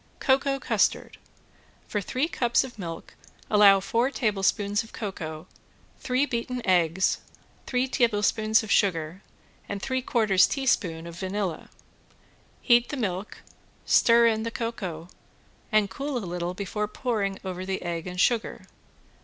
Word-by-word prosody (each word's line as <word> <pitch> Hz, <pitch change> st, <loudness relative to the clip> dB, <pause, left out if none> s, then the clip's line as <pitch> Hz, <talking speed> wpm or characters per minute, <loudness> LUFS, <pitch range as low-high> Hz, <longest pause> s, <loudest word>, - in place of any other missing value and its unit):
~COCOA 275 Hz, 0 st, +2 dB
CUSTARD~ -, -, 0 dB, 0.7 s
For 205 Hz, -, -2 dB
three 255 Hz, +9 st, -1 dB
cups 240 Hz, -8 st, +1 dB
of 245 Hz, -4 st, -10 dB
milk 165 Hz, -3 st, -7 dB, 0.4 s
allow 205 Hz, -2 st, +7 dB
four 230 Hz, +6 st, 0 dB
teaspoons 205 Hz, -3 st, 0 dB
of 225 Hz, -, -16 dB
cocoa, 160 Hz, -6 st, -6 dB, 0.5 s
three 255 Hz, +2 st, +1 dB
beaten 250 Hz, -1 st, -4 dB
eggs, 180 Hz, -1 st, +2 dB, 0.5 s
three 250 Hz, 0 st, 0 dB
tablespoons 220 Hz, -2 st, +2 dB
of 215 Hz, -, -6 dB
sugar, 175 Hz, -2 st, +1 dB, 0.5 s
and 200 Hz, -, -3 dB
three 260 Hz, +5 st, -2 dB
quarters 205 Hz, -7 st, +3 dB
teaspoon 180 Hz, -, 0 dB
of 170 Hz, 0 st, -9 dB
vanilla. 190 Hz, -3 st, -3 dB, 0.9 s
Heat 240 Hz, -1 st, +4 dB
the 295 Hz, -, -4 dB
milk, 200 Hz, -4 st, -4 dB, 0.4 s
stir 235 Hz, 0 st, +5 dB
in 220 Hz, -1 st, +2 dB
the 230 Hz, -, -2 dB
cocoa, 195 Hz, -9 st, -5 dB, 0.6 s
and 215 Hz, -1 st, +3 dB
cool 275 Hz, +7 st, -4 dB
a 225 Hz, -, -4 dB
little 175 Hz, 0 st, -4 dB
before 210 Hz, +2 st, -3 dB
pouring 210 Hz, -4 st, -2 dB
over 185 Hz, -1 st, -4 dB
the 190 Hz, 0 st, -3 dB
egg 170 Hz, -1 st, -4 dB
and 180 Hz, 0 st, -6 dB
sugar. 230 Hz, +3 st, +1 dB
210 Hz, 135 wpm, -26 LUFS, 185-240 Hz, 0.9 s, allow